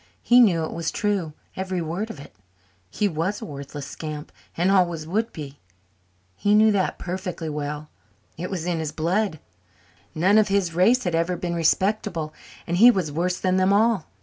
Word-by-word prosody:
He 245 Hz, +1 st, +6 dB
knew 180 Hz, -9 st, +5 dB
it -, -, -6 dB
was 165 Hz, -1 st, -2 dB
true, 195 Hz, -7 st, -1 dB, 0.2 s
every 190 Hz, -1 st, -3 dB
word 175 Hz, +7 st, -3 dB
of 160 Hz, -, -8 dB
it. 140 Hz, -, -13 dB, 0.5 s
He 205 Hz, -, 0 dB
was 180 Hz, +4 st, -2 dB
a -, -, -7 dB
worthless 140 Hz, 0 st, -7 dB
scamp 150 Hz, 0 st, -7 dB, 0.3 s
and 180 Hz, +3 st, +2 dB
always 175 Hz, -5 st, +2 dB
would 220 Hz, +8 st, -1 dB
be. 145 Hz, -2 st, -9 dB, 0.8 s
He 205 Hz, 0 st, +2 dB
knew 215 Hz, +1 st, +6 dB
that 195 Hz, -3 st, 0 dB
perfectly 180 Hz, -3 st, -4 dB
well. 150 Hz, 0 st, -4 dB, 0.5 s
It 180 Hz, +3 st, -5 dB
was 175 Hz, -4 st, -4 dB
in 175 Hz, -2 st, -1 dB
his 155 Hz, -2 st, -3 dB
blood. 170 Hz, +3 st, 0 dB, 0.8 s
None 190 Hz, +7 st, +4 dB
of 215 Hz, -, +3 dB
his 195 Hz, -4 st, +1 dB
race 230 Hz, +9 st, +4 dB
had 180 Hz, -, -1 dB
ever 170 Hz, +2 st, +1 dB
been 175 Hz, 0 st, -3 dB
respectable 170 Hz, -1 st, 0 dB, 0.3 s
and 175 Hz, +1 st, -1 dB
he 235 Hz, +6 st, +9 dB
was 185 Hz, -10 st, +1 dB
worse 180 Hz, +4 st, -1 dB
than 185 Hz, 0 st, +1 dB
them 185 Hz, +1 st, +3 dB
all. 215 Hz, -3 st, +3 dB
180 Hz, 180 wpm, -24 LUFS, 160-200 Hz, 0.8 s, he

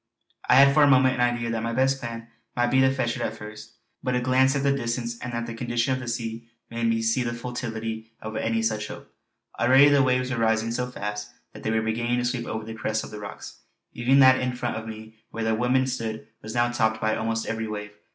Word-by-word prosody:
I -, -, +7 dB
had 140 Hz, +1 st, +7 dB
for 150 Hz, -, +5 dB
a 145 Hz, -, +7 dB
moment 130 Hz, -1 st, +5 dB
an 125 Hz, -, -2 dB
idea 120 Hz, -1 st, -3 dB
that 115 Hz, -1 st, -2 dB
my 115 Hz, +1 st, -2 dB
best 135 Hz, +2 st, +2 dB
plan 115 Hz, -1 st, -6 dB, 0.3 s
might 120 Hz, 0 st, +1 dB
be 130 Hz, -, +4 dB
to 130 Hz, 0 st, +4 dB
fetch 125 Hz, -3 st, -1 dB
it 115 Hz, -, -3 dB
first, 105 Hz, +1 st, -10 dB, 0.3 s
but 125 Hz, -, -1 dB
a -, -, +2 dB
glance 130 Hz, +2 st, +3 dB
at 140 Hz, -, 0 dB
the 140 Hz, -, +3 dB
distance 120 Hz, -2 st, -2 dB
and 125 Hz, -, -5 dB
at 115 Hz, 0 st, -2 dB
the 115 Hz, -, -6 dB
condition 120 Hz, +2 st, -1 dB
of 130 Hz, -, -2 dB
the 130 Hz, -, -7 dB
sea 115 Hz, -1 st, -4 dB, 0.2 s
made 115 Hz, 0 st, -1 dB
me 115 Hz, 0 st, +1 dB
see 115 Hz, +3 st, +2 dB
the 120 Hz, -1 st, -2 dB
futility 115 Hz, -2 st, -5 dB
of 110 Hz, 0 st, -7 dB
any 115 Hz, 0 st, 0 dB
such 110 Hz, -1 st, -1 dB
hope. -, -, -11 dB, 0.5 s
Already 135 Hz, +4 st, +6 dB
the 145 Hz, -1 st, +5 dB
waves 130 Hz, -1 st, +1 dB
were 130 Hz, -, -1 dB
rising 110 Hz, 0 st, +1 dB
so 125 Hz, +1 st, -2 dB
fast 105 Hz, -3 st, -5 dB, 0.2 s
that -, -, -11 dB
they -, -, -2 dB
were 110 Hz, 0 st, +1 dB
beginning 120 Hz, +2 st, 0 dB
to 120 Hz, -, 0 dB
sweep 120 Hz, -1 st, -2 dB
over 110 Hz, -1 st, -4 dB
the 110 Hz, -, -6 dB
crest 110 Hz, -1 st, -2 dB
of -, -, -9 dB
the 105 Hz, -, -7 dB
rocks. 100 Hz, -1 st, -9 dB, 0.3 s
Even 125 Hz, +3 st, +2 dB
that 130 Hz, 0 st, +7 dB
in 125 Hz, -1 st, -2 dB
front 120 Hz, -1 st, -3 dB
of 110 Hz, 0 st, -6 dB
me 110 Hz, 0 st, -9 dB
where 115 Hz, -, -4 dB
the 110 Hz, 0 st, +1 dB
women 125 Hz, +3 st, +2 dB
stood 115 Hz, -4 st, -4 dB
was 110 Hz, +2 st, -7 dB
now 120 Hz, 0 st, +2 dB
topped 110 Hz, -2 st, +1 dB
by 110 Hz, 0 st, +1 dB
almost 115 Hz, 0 st, -2 dB
every 115 Hz, 0 st, -3 dB
wave. 105 Hz, -1 st, -5 dB
115 Hz, 250 wpm, -25 LUFS, 110-125 Hz, 0.5 s, I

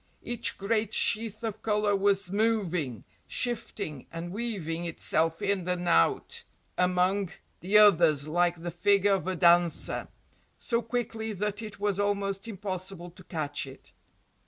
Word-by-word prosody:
Each 240 Hz, -1 st, 0 dB
great 215 Hz, +1 st, 0 dB
sheath 220 Hz, 0 st, +4 dB
of 220 Hz, -2 st, -4 dB
colour 210 Hz, -1 st, +1 dB
was 195 Hz, -1 st, +1 dB
moving, 185 Hz, -, 0 dB, 0.2 s
shifting 215 Hz, -, -4 dB
and 165 Hz, +1 st, -6 dB
weaving 190 Hz, -7 st, -3 dB
itself 165 Hz, -1 st, -1 dB
in 190 Hz, -3 st, 0 dB
and 180 Hz, -1 st, -2 dB
out 85 Hz, -, +2 dB, 0.3 s
among 180 Hz, +1 st, +1 dB, 0.3 s
the 195 Hz, +4 st, +3 dB
others 165 Hz, -8 st, +5 dB
like 175 Hz, +1 st, 0 dB
the 175 Hz, -, -3 dB
figure 200 Hz, +3 st, +3 dB
of 190 Hz, -2 st, -1 dB
a 185 Hz, -, -1 dB
dancer, 175 Hz, -1 st, +2 dB, 0.5 s
so 235 Hz, 0 st, -1 dB
quickly 225 Hz, -1 st, -3 dB
that 210 Hz, +2 st, -3 dB
it 215 Hz, -2 st, -8 dB
was 205 Hz, -1 st, -1 dB
almost 200 Hz, 0 st, -1 dB
impossible 185 Hz, -3 st, -6 dB
to 185 Hz, +2 st, -16 dB
catch 155 Hz, -6 st, -3 dB
it. 135 Hz, 0 st, -14 dB
195 Hz, 135 wpm, -28 LUFS, 175-210 Hz, 0.5 s, others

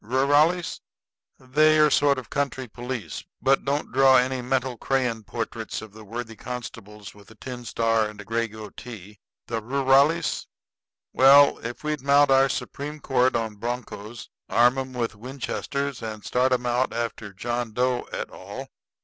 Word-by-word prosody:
Rurales? 145 Hz, +8 st, +2 dB, 0.6 s
They're 155 Hz, +4 st, +4 dB
a 150 Hz, -, +2 dB
sort 140 Hz, -1 st, +4 dB
of 130 Hz, -, -8 dB
country 135 Hz, -2 st, -2 dB
police; 120 Hz, -, -6 dB, 0.2 s
but 135 Hz, +1 st, +2 dB
don't 140 Hz, +2 st, -2 dB
draw 135 Hz, 0 st, +6 dB
any 130 Hz, +1 st, +1 dB
mental 130 Hz, 0 st, -1 dB
crayon 125 Hz, -3 st, -1 dB
portraits 115 Hz, 0 st, -5 dB
of 110 Hz, -2 st, -12 dB
the 110 Hz, 0 st, -12 dB
worthy 115 Hz, +2 st, -6 dB
constables 105 Hz, -4 st, -8 dB
with 100 Hz, -1 st, -17 dB
a 110 Hz, -, -15 dB
tin 125 Hz, +1 st, -8 dB
star 115 Hz, -1 st, +1 dB
and 105 Hz, -1 st, -12 dB
a -, -, -9 dB
gray 115 Hz, +2 st, -1 dB
goatee. 105 Hz, -1 st, -10 dB, 0.3 s
The 115 Hz, -1 st, -3 dB
rurales 135 Hz, +6 st, +2 dB, 0.7 s
well, 140 Hz, +2 st, +7 dB
if 120 Hz, +3 st, -7 dB
we'd 150 Hz, -2 st, -2 dB
mount 140 Hz, +1 st, +4 dB
our 135 Hz, 0 st, +5 dB
Supreme 145 Hz, +3 st, -5 dB
Court 130 Hz, -3 st, +2 dB
on 110 Hz, -2 st, -2 dB
broncos, 115 Hz, -1 st, -6 dB, 0.2 s
arm 120 Hz, +3 st, +4 dB
'em 130 Hz, -1 st, -5 dB
with 120 Hz, -3 st, -2 dB
Winchesters, 135 Hz, +3 st, -4 dB
and 110 Hz, -2 st, -6 dB
start 125 Hz, +1 st, +1 dB
'em 125 Hz, -1 st, +1 dB
out 120 Hz, +1 st, +1 dB
after 115 Hz, -3 st, -4 dB
John 120 Hz, +4 st, -3 dB
Doe 125 Hz, +2 st, 0 dB
et -, -, -4 dB
al. -, -, -9 dB
125 Hz, 160 wpm, -25 LUFS, 115-135 Hz, 0.7 s, well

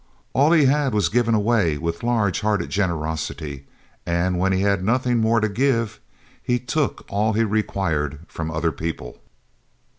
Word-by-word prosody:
All 145 Hz, +4 st, +4 dB
he 155 Hz, -4 st, +5 dB
had 135 Hz, -3 st, +2 dB
was 100 Hz, -5 st, +2 dB
given 115 Hz, +1 st, +2 dB
away 105 Hz, -8 st, +2 dB
with 85 Hz, +2 st, -3 dB
large 115 Hz, -6 st, +1 dB
hearted 105 Hz, -1 st, 0 dB
generosity 80 Hz, -6 st, -3 dB, 0.4 s
and 85 Hz, +1 st, 0 dB
when 95 Hz, +1 st, +2 dB
he 95 Hz, 0 st, +1 dB
had 100 Hz, -2 st, +1 dB
nothing 125 Hz, +3 st, +1 dB
more 115 Hz, +1 st, +3 dB
to 110 Hz, -, +1 dB
give, 115 Hz, 0 st, 0 dB, 0.4 s
he 125 Hz, -, +1 dB
took 125 Hz, +5 st, -2 dB
all 105 Hz, +2 st, 0 dB
he 115 Hz, +2 st, +2 dB
required 95 Hz, -9 st, -1 dB
from 80 Hz, -1 st, -5 dB
other 80 Hz, +1 st, 0 dB
people! 80 Hz, -7 st, -6 dB
100 Hz, 155 wpm, -22 LUFS, 85-115 Hz, 0.4 s, he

